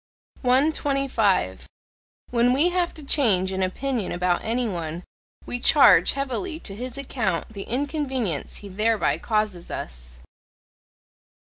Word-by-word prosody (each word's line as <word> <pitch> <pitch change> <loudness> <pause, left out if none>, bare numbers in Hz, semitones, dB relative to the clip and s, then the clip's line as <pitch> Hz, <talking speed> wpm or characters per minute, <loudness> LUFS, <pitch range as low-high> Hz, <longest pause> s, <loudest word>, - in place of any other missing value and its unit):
125. 260 - +1 0.6
When 245 +1 +3
we 300 +7 +3
have 355 -1 0
to 310 - -9
change 210 -10 +2
an 190 0 -2
opinion 225 +3 -2
about 175 0 0
any 235 +2 0
one, 170 -3 -4 0.4
we 245 - -4
charge 280 +3 +6
heavily 280 +5 -3
to 195 - -7
his 250 +4 -6
account 225 -10 -2
the 200 -3 -8
inconvenience 260 - -2
he 205 - -10
thereby 215 +3 +1
causes 215 -6 -1
us. - - -7
230 Hz, 120 wpm, -24 LUFS, 190-275 Hz, 0.6 s, charge